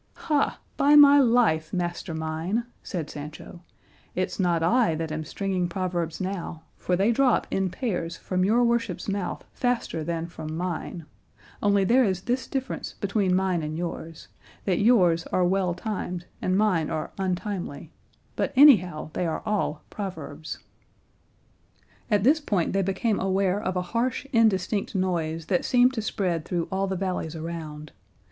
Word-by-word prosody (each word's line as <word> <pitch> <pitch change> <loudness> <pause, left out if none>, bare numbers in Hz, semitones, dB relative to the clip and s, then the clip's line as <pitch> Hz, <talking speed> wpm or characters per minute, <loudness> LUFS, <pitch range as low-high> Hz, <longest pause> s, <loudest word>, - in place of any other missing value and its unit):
'" - - -39 0.2
"Ha, 295 -2 +2 0.2
by 290 +1 +5
my 285 -1 +9
life, 230 - +3
master 175 -1 -3
mine," 160 +8 -2 0.2
said 170 -7 -4
Sancho, 150 +4 -9 0.5
"it's 185 +2 -2
not 175 -3 +2
I 225 -2 +3
that 160 0 -3
am 155 0 -3
stringing 185 +2 -2
proverbs 175 -3 -2
now, 185 -4 -4
for 180 - -1
they 195 +5 +3
drop 255 0 +3
in 195 -1 0
pairs 175 -5 -3
from 185 -1 -1
your 225 +5 +3
worship's 235 -6 0
mouth 200 -3 -3
faster 245 -10 -1
than 165 +1 -2
from 160 -2 -6
mine; 175 -1 -4 0.6
only 200 -1 +3
there 245 +7 +4
is 190 -5 0
this 250 +2 -1
difference 265 -1 -4
between 200 -2 0
mine 185 -2 +1
and 155 +1 -4
yours, 165 -2 -6 0.4
that 185 -3 +1
yours 180 -7 +4
are 180 - +1
well 180 -1 +1
timed 180 -3 -4 0.2
and 185 +1 +1
mine 185 -7 +2
are 155 -2 -3
untimely; 180 -5 -3 0.4
but - - -1
anyhow, 185 - +6
they 180 - -1
are 160 - -3
all 205 -8 -1
proverbs." 160 -6 -6 1.5
At 205 -3 +2
this 290 +7 +5
point 200 - 0
they 195 - +2
became 195 +3 0
aware 190 +1 +1
of 185 -3 -2
a 180 - 0
harsh 245 +4 0
indistinct 210 -3 +2
noise 165 -4 -1
that 180 +1 +1
seemed 250 +1 +4
to 225 - -2
spread 180 -6 -1
through 170 0 -2
all 195 +1 0
the 190 - -2
valleys 180 -4 -3
around. 155 -2 -6
185 Hz, 155 wpm, -26 LUFS, 165-210 Hz, 1.5 s, my